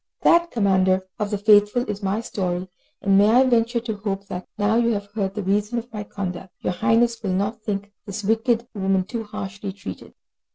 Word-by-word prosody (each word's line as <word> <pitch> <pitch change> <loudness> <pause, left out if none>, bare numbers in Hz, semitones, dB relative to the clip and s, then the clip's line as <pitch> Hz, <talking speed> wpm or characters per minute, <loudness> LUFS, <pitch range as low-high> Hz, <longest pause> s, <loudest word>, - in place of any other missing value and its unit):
This, 340 0 +5
Commander 190 - +2
of 210 -1 -1
the 205 - -1
Faithful, 210 +3 +4
is 210 -1 -4
my 200 +3 0
story, 185 -5 -3 0.4
and 195 -1 +5
may 205 +1 +5
I 245 +4 +6
venture 235 -1 +2
to 225 -3 -4
hope 200 -1 -3
that, 180 0 -5
now 205 +1 +2
you 235 0 +3
have 200 -1 -4
heard 195 -3 -2
the 210 - -3
reason 205 +4 0
of 235 0 -5
my 210 -1 -4
conduct, 190 -2 -6
your - - -1
Highness 230 +4 +2
will 195 -4 -1
not 205 +4 -1
think 205 -1 -3 0.2
this 205 +1 -5
wicked 225 +3 +1
woman 190 -2 +1
too 225 +4 -5
harshly 200 -1 -6
treated? 200 +1 -9
205 Hz, 200 wpm, -23 LUFS, 195-225 Hz, 0.4 s, I